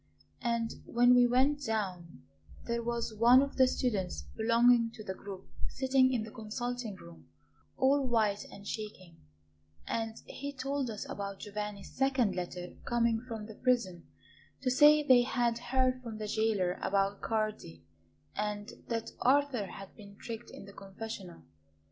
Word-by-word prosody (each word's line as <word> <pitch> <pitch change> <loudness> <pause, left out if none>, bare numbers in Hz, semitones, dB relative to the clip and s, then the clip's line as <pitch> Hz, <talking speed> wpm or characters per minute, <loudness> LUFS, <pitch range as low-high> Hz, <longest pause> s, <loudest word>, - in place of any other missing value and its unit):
And 235 -1 -1
when 245 +1 +5
we 245 0 +6
went 270 +4 +2
down 185 - -3 0.4
there 235 0 -1
was 235 -1 -2
one 240 +5 +6
of 280 - -5
the 260 -1 +6
students 210 -8 -1
belonging 230 +1 +4
to 215 - -9
the 190 - -4
group 190 0 -9 0.2
sitting 260 0 +3
in 240 -4 0
the 220 - -9
consulting 240 0 -4
room, 85 - -14 0.5
all 270 0 +3
white 215 -4 +1
and 200 0 -11
shaking; 185 -6 -6 0.7
and 225 -1 -2
he 285 +1 -6
told 275 -1 -2
us 215 -2 -5
about 200 -1 -5
Giovanni's 210 -1 -5
second 260 -7 +2
letter 180 0 -5
coming 235 -1 +1
from 225 -3 -5
the 220 - -9
prison 220 -8 0 0.6
to 255 - +2
say 295 +3 +7
that - - -16
they 255 -2 +8
had 240 -1 0
heard 255 +1 +1
from 230 -3 -7
the 215 - -4
jailer 210 -4 0
about 195 0 +1
Cardi, 215 - -2 0.5
and 210 0 -3 0.2
that 230 -1 -3
Arthur 265 -5 +3
had 195 0 -10
been 200 -2 -13
tricked 230 +2 -7
in - - -10
the 200 - -12
confessional. 195 - -8
225 Hz, 155 wpm, -32 LUFS, 200-250 Hz, 0.7 s, they